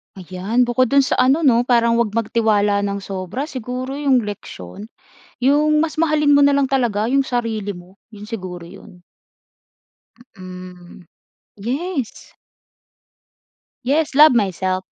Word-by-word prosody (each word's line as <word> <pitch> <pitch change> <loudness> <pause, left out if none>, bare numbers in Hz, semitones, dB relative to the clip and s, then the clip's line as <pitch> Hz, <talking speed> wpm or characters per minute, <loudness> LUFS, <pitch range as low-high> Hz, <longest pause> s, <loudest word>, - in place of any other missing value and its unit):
Ayan, 190 +6 -1
bukod 245 +1 +1
do’n 275 +1 +3
sa 255 - -1
ano 270 +6 +3
‘no, 245 -2 +3
parang 235 -1 +3
huwag 220 -2 -1
magtiwala 210 -3 +1
nang 200 -1 -3
sobra. 190 +7 -5
Siguro 255 0 -5
‘yong 265 -4 +2
leksiyon, 205 - -9 0.5
‘yong 295 +4 +2
mas 315 0 0
mahalin 300 -2 +3
mo 285 - +5
na 285 - +5
lang 280 -1 +2
talaga 240 -6 0
‘yong 275 +3 +2
sarili 230 -5 -3
mo, 180 -1 -11 0.2
‘yon 210 -1 -11
siguro 185 -6 -7
‘yon. 180 +1 -14 1.4
Mm, 180 -1 -12 0.5
yes. 270 - -5 1.5
Yes, 285 +1 0
love 300 -2 +7
myself. 190 -3 -1
230 Hz, 130 wpm, -19 LUFS, 200-270 Hz, 1.5 s, love